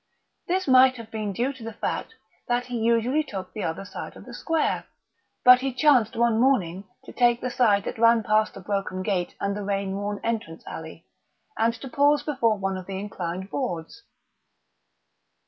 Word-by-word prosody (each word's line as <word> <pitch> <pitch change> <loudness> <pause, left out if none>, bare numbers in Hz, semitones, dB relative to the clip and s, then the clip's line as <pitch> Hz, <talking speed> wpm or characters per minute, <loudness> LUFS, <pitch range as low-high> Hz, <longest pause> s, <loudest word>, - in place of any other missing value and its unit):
This 370 0 0
might 260 0 +6
have 230 -2 -10
been 215 -2 -3
due 245 +8 -1
to 260 -4 -12
the 225 0 -6
fact 450 - -3 0.3
that 245 0 0
he 250 -1 -4
usually 235 +6 +2
took 195 -10 -7
the 215 - -5
other 180 +4 -3
side - - -8
of - - -13
the - - -10
square. 325 -2 -1 0.6
But 250 0 +9
he 270 0 -1
chanced 255 -4 +3
one 230 -1 +2
morning 200 -8 +1 0.2
to - - -11
take 240 -1 +3
the 250 - -3
side 210 -6 +3
that - - -5
ran 230 0 +5
past 215 0 +2
the 195 - -9
broken 195 -1 -3
gate 185 -3 -1
and 200 0 -1
the 210 - -4
rain 195 -1 -2
worn 205 0 -3
entrance 220 -8 -3
alley, 160 0 -9 0.5
and 230 +1 +1
to 270 - -9
pause 285 +3 +3
before 235 -7 +1
one 195 -1 -2
of 185 - -8
the 190 -1 -4
inclined 190 -1 -5
boards. 230 -5 -4
225 Hz, 185 wpm, -25 LUFS, 195-250 Hz, 0.6 s, But